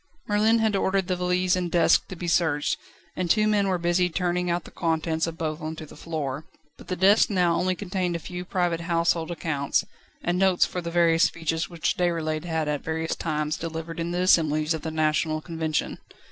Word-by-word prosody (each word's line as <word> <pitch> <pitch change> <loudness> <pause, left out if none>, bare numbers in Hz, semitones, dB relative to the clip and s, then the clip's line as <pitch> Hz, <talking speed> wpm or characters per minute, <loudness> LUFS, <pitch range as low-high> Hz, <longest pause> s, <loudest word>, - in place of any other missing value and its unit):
Merlin 215 +2 +3
had 220 -2 +1
ordered 195 -1 +1
the 185 - 0
valise 180 0 +1
and 180 -1 -2
desk 170 0 +3
to 185 - -7
be 175 0 -5
searched, 160 -4 +1 0.4
and 180 -1 -2
two 215 +2 +4
men 205 -2 +2
were 185 -1 +1
busy 175 +1 +1
turning 180 +1 -1
out 170 0 0
the - - -13
contents 160 -1 -1
of 165 0 -6
both 155 0 -3
on 155 +1 -4
to 155 - -8
the - - -14
floor. 150 -3 -4 0.3
But - - -15
the 185 - -2
desk 195 +4 +5
now 180 -4 +2
only 185 +2 +1
contained 180 -2 -2
a - - 0
few 180 +2 -6
private 175 -2 0
household 170 -1 +1
accounts, 150 -4 -1 0.4
and 175 +1 0
notes 190 -2 +4
for 180 - -4
the 170 - -4
various 170 0 +4
speeches 165 0 -2
which 170 -2 -1
Déroulède 165 -3 -1
had 160 -2 -1
at 150 -1 -1
various 160 0 -2
times 150 -1 -2
delivered 165 0 -5
in 165 0 -2
the 175 +1 -1
assemblies 155 -3 +3
of 160 - -4
the 160 - -4
National 155 0 +1
Convention. 160 -1 -3
170 Hz, 205 wpm, -25 LUFS, 160-180 Hz, 0.4 s, desk